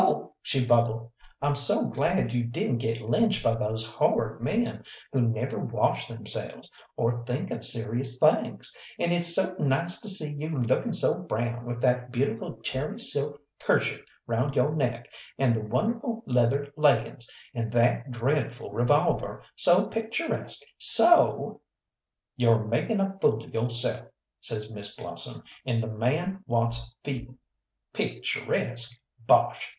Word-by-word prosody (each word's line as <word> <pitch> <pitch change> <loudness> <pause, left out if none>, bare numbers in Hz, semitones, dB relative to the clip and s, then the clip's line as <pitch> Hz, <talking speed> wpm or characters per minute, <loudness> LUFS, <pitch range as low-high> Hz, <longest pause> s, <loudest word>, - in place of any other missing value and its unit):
"Oh," - - 0
she 130 -2 0
bubbled, 115 -1 +2 0.3
"I'm 145 0 +2
so 140 0 +4
glad 115 - 0
you 120 -1 +1
didn't 120 +1 -1
get 115 0 -2
lynched 205 - +1
by 115 - +3
those 110 -1 -1
horrid 110 - 0
men - - -1 0.3
who 130 - +2
never 120 +3 -1
wash - - 0
themselves, - - -5 0.3
or 120 +1 0
think 125 +4 -3
of - - -4
serious 120 +3 -1
things; - - +2 0.2
and 170 - +1
it's 175 -1 +5
so 190 -1 +1
nice 150 +5 0
to 220 - -5
see 155 -6 -1
you 150 0 -4
looking 120 -2 +1
so - - +2
brown 120 +2 -3
with 120 0 -4
that 125 -1 +1
beautiful 120 -3 -2
cherry 150 - -3
silk 145 - +2 0.2
kerchief - - +1 0.2
round 130 +4 -1
yo' - - +3
neck, 125 -6 -1 0.3
and 130 -4 +3
the 110 - -2
wonderful 225 - -2
leather 130 +3 +1
leggings, 145 -5 +2 0.2
and 115 -3 -3
that 120 +2 +2
dreadful 120 0 -2
revolver, 120 +1 +1
so 180 +3 +5
picturesque, 225 - -3 0.2
so 345 0 +5 0.4
" - - -63
"You're 115 -3 +3
making 120 - 0
a 195 0 -1
fool 110 +1 +2
of - - -15
yo'self," 115 +1 +1 0.3
says 105 0 -3
Miss 100 -2 -2
Blossom, - - -4 0.2
"and 115 -3 0
the - - -4
man 155 - -1
wants 115 0 0
feeding. 125 -2 -6 0.6
Picturesque! 120 0 -2 0.3
Bosh! - - +4
125 Hz, 145 wpm, -27 LUFS, 115-150 Hz, 0.6 s, it's